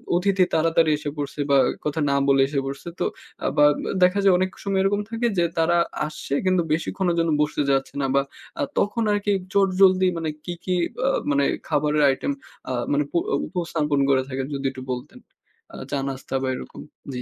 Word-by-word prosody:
অতিথি 190 +1 +3
তাড়াতাড়ি 165 0 +3
এসে 145 - -4
পড়ছে 145 0 -5
বা 140 - +5
এক - - -9
কথা 150 +1 -1
না - - +2
বলে 135 -1 +5
এসে 140 0 -1
পড়ছে। 135 +4 -6
তো - - +1 0.4
আ - - -2
বা 150 - +6 0.4
দেখা 185 +2 +4
যায় 195 -1 +6
অনেক 185 +1 +1
সময় 195 -1 0
এরকম 205 +1 +1
থাকে 230 +1 0
যে, 175 - +3
তারা 170 +1 +3 0.3
আসছে 150 -2 -6
কিন্তু 185 -1 +3
বেশিক্ষণের 170 +2 -1
জন্য 165 -1 +1
বসতে 150 0 0
চাচ্ছে 135 -1 +1
না - - +1
বা 140 - +5 0.4
আ - - +2 0.2
তখন 225 +3 0
আরকি 205 0 0 0.2
চটজলদি 185 -1 +4
মানে 165 -1 -2 0.2
কি, 175 - -3
কি 185 - -1 0.2
বা 255 +2 0 0.2
মানে 140 0 +2 0.2
খাবারের 150 +1 +1
আইটেম 135 - -1 0.4
আ - - -2 0.2
মানে 145 +1 +2
প - - -41 0.3
উপস্থাপন 160 -5 -1
করে 135 -1 +4
থাকেন? 135 0 -3
যদি 140 0 -5
একটু 130 -1 -9
বলতেন। 125 0 -6 0.5
আ - - -8 0.2
চা-নাস্তা 135 -1 -3
বা, 135 - -1
এরকম। - - -9 0.3
জি। 125 - -4
160 Hz, 190 wpm, -23 LUFS, 140-185 Hz, 0.5 s, বা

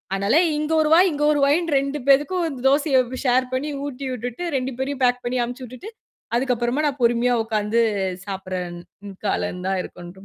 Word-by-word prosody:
ஆனால, 200 +5 +1 0.2
இங்க 305 +1 -2
ஒரு 305 - +1
வாய், 360 +3 +6
இங்க 295 0 -2
ஒரு 295 - +1
வாயின்னு 310 +2 +1
2 275 +2 -3
பேருக்கும் 295 +2 +2
தோசைய 280 0 +3 0.3
ஷேர் 255 0 +3
பண்ணி 270 +4 -1 0.2
ஊட்டி 275 -1 -6
விட்டுட்டு 245 +5 -5
2 260 0 -1
பேரையும் 270 +1 -3
பேக் 250 0 +2
பண்ணி 245 +1 -2
அனுப்பிச்சு 245 +2 -6
விட்டுட்டு 255 - -10 0.5
அதுக்கு 250 +1 +1
அப்புறமா 240 +5 -1
நான் 280 -2 -1
பொறுமையா 240 +1 +3
உக்காந்து 220 0 0 0.5
சாப்பிடுறன் 185 -3 -5 0.5
கால 200 - +1
இருந்தா 180 +1 -4
இருக்குன்டு 175 +2 -11
255 Hz, 170 wpm, -22 LUFS, 230-285 Hz, 0.5 s, வாய்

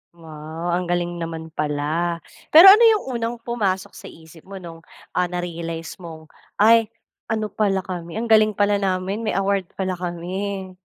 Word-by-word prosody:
Wow! 160 +1 -7
Ang 175 0 -1
galing 175 0 -2
naman 160 -1 -6
pala. 155 +3 -2 0.2
Pero 350 +5 +10
ano 430 +4 +6
'yong 435 -2 +3
unang 230 +1 -2
pumasok 200 -6 -2
sa - - -12
isip 160 0 -15
mo 195 - -9
no'ng, 170 -3 -9 0.3
ah, 180 - 0
na-realize 170 -1 -6
mong, 160 -3 -11 0.2
"Ay! 225 +1 +5 0.4
Ano 215 -2 -2
pala 195 -3 0
kami 175 -1 -7
ang 225 - -2
galing 215 -1 +5
pala 205 0 +2
namin 190 +1 -2
may 225 -4 -2
award 195 -1 0
pala 185 -2 -3
kami." 185 +2 -4
180 Hz, 160 wpm, -22 LUFS, 165-205 Hz, 0.4 s, Pero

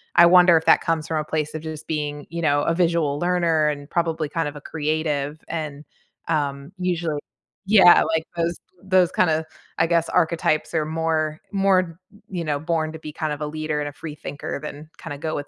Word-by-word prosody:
I 170 - +8
wonder 175 -1 +7
if 160 - -2
that - - +6
comes 165 -1 -1
from 160 - -1
a - - -1
place 155 -1 -2
of 155 - -4
just 155 -1 -7
being, 150 -2 -3
you 170 +1 -4
know, 145 -3 +2
a 165 - +1
visual 165 -4 +1
learner 170 -3 +2
and 145 -1 -5
probably 165 -3 -1
kind 165 0 -1
of 145 - -12
a - - -10
creative 150 -1 -2
and, 150 -2 -5 0.4
um, 145 -2 -2
usually 170 -4 -1 0.5
yeah, 195 -3 +7
like, 160 0 -1
those 170 0 0 0.3
those 185 -2 +3
kinda, 160 -3 +2 0.3
I 165 - +3
guess, 170 0 +2
archetypes 165 -2 +1
are 155 -1 +1
more 160 -1 -1
more, 195 -2 +3 0.3
b 200 -3 -8
you - - -2
know, 150 -2 -1
born 160 0 -1
to 160 - -8
be 155 -1 -8
kind 155 -1 -2
of 150 - -7
a 150 - -2
leader 155 0 -3
and 145 0 -2
a - - -12
free 150 0 -8
thinker 145 -1 -6
than 150 +1 -8
kinda 145 -3 -6
go 155 +1 -3
with 145 0 -4
160 Hz, 210 wpm, -23 LUFS, 150-170 Hz, 0.5 s, I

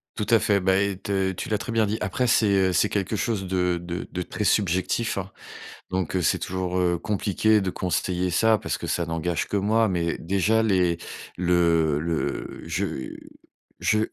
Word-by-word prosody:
Tout 105 - -2
à 115 - +6
fait, 100 -2 +2
beh 95 +2 +2
et 95 - -10
te 95 -1 -1
tu 95 - -6
l'as 105 -1 0
très 115 - -5
bien 110 -1 +2
dit. 105 +2 -1
Après, 110 +5 -1
c'est, 115 -3 +3 0.2
heu, 90 - -1
c'est 105 +4 +3
quelque 100 +1 -1
chose 105 -2 -1
de 90 -1 0
de 85 0 -5
de 90 - -3
très 105 - -4
subjectif 95 +3 +1
hein. 95 +1 -6 0.6
Donc, 95 -1 -1
heu, 90 - +1
c'est - - +2
toujours, 95 0 -2
heu, 90 -1 +2
compliqué 105 +2 +1
de 95 - -2
conseiller 90 0 -1
ça, 110 +5 +4
parce - - -3
que - - -6
ça 85 - 0
n'engage 80 +1 -2
que 100 - -1
moi. 110 +3 +2
Mais 85 -3 -1
déjà 100 +5 +1
les 90 -5 +2 0.4
le 85 -4 +2
le 80 +1 -3
je 65 - -3 0.7
je 110 -1 +2
95 Hz, 190 wpm, -25 LUFS, 90-105 Hz, 0.7 s, à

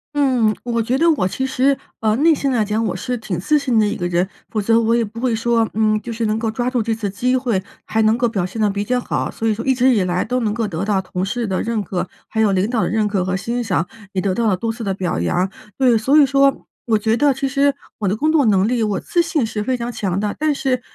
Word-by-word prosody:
嗯， 250 -7 +2
我 235 -1 -1
觉 245 +4 0
得 335 +4 +4
我 275 -12 +1
其 265 +8 -3
实 265 +1 +2 0.2
呃， 215 -1 +1
内 320 +3 +5
心 280 -2 -1
来 230 -4 +1
讲， 215 +2 -1
我 220 - -1
是 250 - -3
挺 185 -6 -4
自 300 +11 +2
信 260 -5 0
的 215 - +4
一 205 - -1
个 175 - -2
人。 175 +1 +1 0.2
否 215 - -2
则 225 +3 +3
我 230 0 +2
也 235 -1 +1
不 225 +3 -9
会 240 -2 0
说， 230 0 +1
嗯， 215 -1 +2
就 235 - -6
是 230 0 -2
能 215 +1 0
够 225 -1 -1
抓 240 +3 -2
住 250 -2 0
这 225 +1 -1
次 220 -2 -3
机 250 +5 +1
会， 235 -7 0 0.2
还 220 - 0
能 220 +1 +3
够 240 - +2
表 200 -6 -1
现 185 +5 -5
得 215 - +3
比 200 +1 -2
较 250 +4 0
好， - - -2
所 225 - -3
以 220 - +3
说 225 +2 -5
一 265 -1 +3
直 255 +1 +4
以 210 - +2
来 180 0 -1
都 250 0 -1
能 220 -4 0
够 225 0 -1
得 165 +1 -3
到 200 -1 +1
同 185 -1 -4
事 235 +4 -2
的 190 -3 -1
认 225 -2 -1
可， 180 -1 -3 0.2
还 220 - -1
有 215 -2 +3
领 190 +2 +1
导 235 -3 0
的 - - 0
认 215 -1 +1
可 200 -3 0
和 185 0 -1
欣 240 +4 -2
赏， 180 -5 0 0.3
也 190 - 0
得 195 -1 0
到 230 +3 0
了 195 -4 +2
多 225 +4 -2
次 230 - -7
的 195 -2 -1
表 185 - -2
扬。 175 - +1 0.3
对， 255 -3 +4
所 265 +7 +3
以 295 - +7
说， 275 0 +2 0.2
我 225 -2 +2
觉 220 +1 +1
得 285 +4 +3
其 270 +1 -2
实 280 +1 +2 0.2
我 205 - -1
的 190 - +1
工 305 +7 +1
作 300 -4 +3
能 200 -2 +3
力， 240 -1 0
我 210 -3 0
自 345 - +1
信 310 -6 0
是 215 -1 -3
非 255 +3 -1
常 235 0 -4
强 195 -5 -2
的。 210 0 -2
但 305 0 +2
是， 260 -3 -1
225 Hz, 310 characters per minute, -19 LUFS, 205-250 Hz, 0.3 s, 以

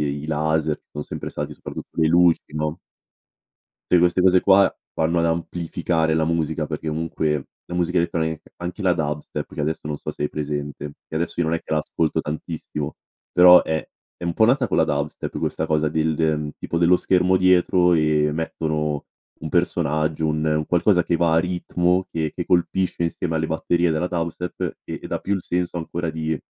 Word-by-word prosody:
i 70 0 -2
i - - -6
laser, 80 0 0
che 75 - -14
o - - -1
sempre - - -6
stati, - - -5
soprattutto - - -9
le 80 - +4
luci, 85 0 +4
no 75 +1 -3 1.1
tutte 90 - +6
queste 90 +1 +3
cose 90 0 +5
qua 100 +1 +6 0.3
vanno 85 +2 +1
ad 85 - +2
amplificare 80 -1 -1
la 80 0 +2
musica, 80 -1 -1
perché 80 +1 -4
comunque, 75 -2 -1 0.2
la 90 - -7
musica 90 +1 +1
elettronic 80 -2 -1 0.2
anche 90 +4 -6
la 90 -2 +3
dubstep, 75 -3 -3
che - - -4
adesso 75 0 -2
non 75 - -3
so - - -5
se - - -6
hai 75 - +1
presente, 75 -1 -4
che - - -9
adesso 85 +2 -1
io 85 - +1
non 80 - +1
è - - 0
che - - -7
la 75 - +3
ascolto 75 0 -1
tantissimo, 75 -1 -5 0.4
però 90 0 +8
è 80 0 -2 0.3
è 85 - -7
un 85 - 0
po' 110 +6 +4
nata 130 +2 +3
con - - 0
la - - +5
dubstep 70 +1 -3
questa 80 - -1
cosa 80 -1 +1
del, 80 0 0
ehm, 75 -2 0
tipo 85 - -2
dello 85 +1 +5
schermo 90 +1 +3
dietro, 90 -1 +4
e 75 -2 +3
mettono 75 -2 -2 0.4
un 80 - -5
personaggio, 80 -3 +1
un 75 0 0
un 75 0 +1
qualcosa 90 0 +3
che 85 - +1
va 85 -1 +2
a - - +5
ritmo, 90 +1 0
che 80 -2 -2
che - - -3
colpisce 90 0 +1
insieme 85 0 -2
alle 80 - 0
batterie 85 +2 +1
della 85 +3 -1
dubstep, 85 0 -3
e - - -5
e - - -6
dà - - -2
più 100 - -1
il 95 - -3
senso 90 0 -2
ancora 85 0 -3
di 80 -1 -2
80 Hz, 200 wpm, -22 LUFS, 75-90 Hz, 1.1 s, però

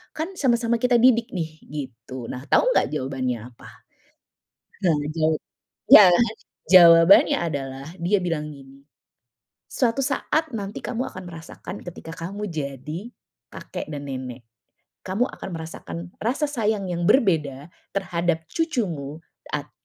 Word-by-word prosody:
kan 320 +4 -3
sama-sama 235 -3 +2
kita 250 -1 +3
didik 235 -1 +4
nih," 160 -3 -2 0.2
gitu. 130 -3 -7
Nah, 130 +3 -7
tahu - - +4
enggak - - +3
jawabannya 130 -4 -2
apa? - - -14 1.1
Nah, 170 -3 +4 0.2
jawab 155 -1 +1 0.5
ya, 205 - +11 0.6
jawabannya 170 0 +8
adalah 135 -4 -4
dia 190 +4 +2
bilang 155 -3 -2
gini, 135 0 -16 0.9
"Suatu 250 +1 +1
saat 310 +3 0
nanti 200 0 -6
kamu 250 +2 -3
akan 185 - -7
merasakan 165 +4 -9
ketika 165 -2 -9
kamu 200 +4 -5
jadi, 150 - -5 0.4
kakek - - -7
dan 140 -1 -6
nenek. 130 -2 -6 0.6
Kamu 195 +7 +1
akan - - -8
merasakan 160 - -7 0.2
rasa 255 +7 0
sayang 210 -7 -1
yang 170 0 -2
berbeda 160 - +2 0.3
terhadap 170 -3 -1
cucumu 185 - -2 0.4
at 145 0 -4
170 Hz, 125 wpm, -24 LUFS, 140-220 Hz, 1.1 s, ya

